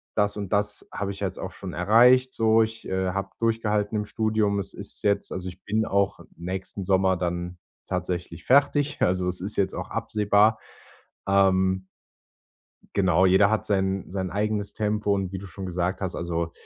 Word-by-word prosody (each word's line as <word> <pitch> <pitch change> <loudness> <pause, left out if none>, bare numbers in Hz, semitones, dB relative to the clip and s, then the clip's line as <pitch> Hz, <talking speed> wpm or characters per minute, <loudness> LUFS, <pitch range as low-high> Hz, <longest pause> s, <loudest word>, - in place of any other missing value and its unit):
das 105 0 +1
und 100 -1 -4
das 105 0 -1
habe 100 -1 -2
ich 100 - -8
ja 100 - +1
jetzt - - -8
auch - - -5
schon - - -8
erreicht, 125 +7 +5
so. 110 0 +4
Ich, 110 0 -6
äh, 95 0 -1
habe 100 +1 -3
durchgehalten 110 -2 0
im 105 - -1
Studium.“ 110 -2 0
Es 95 - -5
ist - - -9
jetzt 100 -1 +1
also, 90 0 -4
ich 90 +1 -13
bin 110 +1 0
auch 100 0 +1 0.2
nächsten 95 +3 -5
Sommer 95 -1 +3
dann 90 0 -3 0.3
tatsächlich 90 -2 -4
fertig, 145 +2 +3
also, 90 0 +2
es 90 0 -2
ist 100 +3 -5
jetzt 100 - +1
auch - - -5
absehbar. 105 +1 +2 0.7
Ähm. 95 -1 +3 1.1
Genau, 95 -2 +3
jeder 95 +3 +5
hat 110 - 0
sein 95 -1 0
sein 95 -1 -3
eigenes 105 0 -1
Tempo 105 -1 0
und 95 -2 -2
wie - - -2
du 100 - -9
schon 95 +1 -8
gesagt 90 +2 -2
hast, 95 -2 -3
also, 85 -1 -2
100 Hz, 180 wpm, -25 LUFS, 95-105 Hz, 1.1 s, erreicht